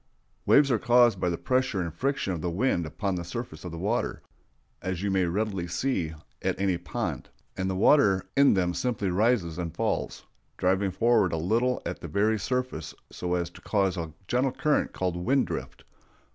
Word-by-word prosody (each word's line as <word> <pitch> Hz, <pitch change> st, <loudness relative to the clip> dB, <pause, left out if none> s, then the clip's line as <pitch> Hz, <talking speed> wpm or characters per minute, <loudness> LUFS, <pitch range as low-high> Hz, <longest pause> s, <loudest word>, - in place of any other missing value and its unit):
Waves 140 Hz, -1 st, +6 dB
are 115 Hz, -, +2 dB
caused 120 Hz, -4 st, +4 dB
by 90 Hz, -, +1 dB
the 85 Hz, -, -2 dB
pressure 130 Hz, -5 st, 0 dB
and 85 Hz, -3 st, -3 dB
friction 135 Hz, -1 st, -1 dB
of 85 Hz, -, -4 dB
the 90 Hz, -, -1 dB
wind 90 Hz, -3 st, 0 dB
upon 95 Hz, +6 st, -2 dB
the 90 Hz, -1 st, -3 dB
surface 85 Hz, -3 st, -6 dB
of 90 Hz, -, -6 dB
the 85 Hz, -, -6 dB
water, 105 Hz, +8 st, -1 dB, 0.6 s
as 95 Hz, 0 st, -3 dB
you 100 Hz, -, 0 dB
may 95 Hz, -1 st, +2 dB
readily 95 Hz, 0 st, -1 dB
see 90 Hz, -5 st, -1 dB, 0.3 s
at -, -, -1 dB
any 95 Hz, -2 st, +2 dB
pond; 95 Hz, -, -4 dB, 0.3 s
and 95 Hz, 0 st, -2 dB
the 95 Hz, -, -1 dB
water 95 Hz, -3 st, +4 dB
in 140 Hz, -5 st, +5 dB
them 90 Hz, -2 st, +1 dB
simply 105 Hz, -4 st, -1 dB
rises 95 Hz, -4 st, +1 dB
and 85 Hz, -3 st, -4 dB
falls, -, -, -2 dB, 0.3 s
driving 95 Hz, +2 st, +2 dB
forward 115 Hz, -1 st, +3 dB
a -, -, 0 dB
little 115 Hz, +10 st, +1 dB
at -, -, -4 dB
the -, -, -6 dB
very 105 Hz, +2 st, +1 dB
surface 125 Hz, -6 st, -3 dB, 0.2 s
so 90 Hz, 0 st, -2 dB
as 85 Hz, -1 st, -2 dB
to -, -, -14 dB
cause 100 Hz, -3 st, +1 dB
a 80 Hz, -3 st, -4 dB, 0.2 s
gentle 125 Hz, +2 st, +1 dB
current 150 Hz, +3 st, +1 dB
called 90 Hz, -2 st, -2 dB
wind 130 Hz, +11 st, +2 dB
drift. -, -, -6 dB
95 Hz, 190 wpm, -27 LUFS, 90-120 Hz, 0.6 s, Waves